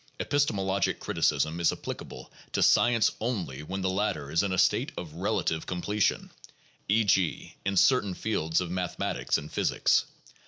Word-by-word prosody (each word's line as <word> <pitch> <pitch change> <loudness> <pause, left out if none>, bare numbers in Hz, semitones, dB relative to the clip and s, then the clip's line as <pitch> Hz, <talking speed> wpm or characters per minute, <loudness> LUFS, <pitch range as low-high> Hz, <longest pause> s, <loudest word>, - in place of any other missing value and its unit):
Bpistemologic 100 -9 0
criticism 80 +4 0
is 85 - +3
applicable - - -8 0.2
to - - +2
science 120 -2 +4
only 95 - -3
when 95 +5 -5
the 95 - 0
latter 85 -8 -2
is 85 +3 +3
in 100 -1 -1
a 95 - -1
state - - +2
of 80 -4 -6
relative 85 -2 -1
com 90 -1 -4
pletion, 105 0 0 0.6
e. 110 +3 +4
g., 95 -4 0
in 95 0 -1
certain 100 -5 +3
fields 85 -6 0
of 90 -2 -4
mathematics 90 -1 -1
and 75 - -8
physics. - - +2
95 Hz, 155 wpm, -28 LUFS, 85-105 Hz, 0.6 s, science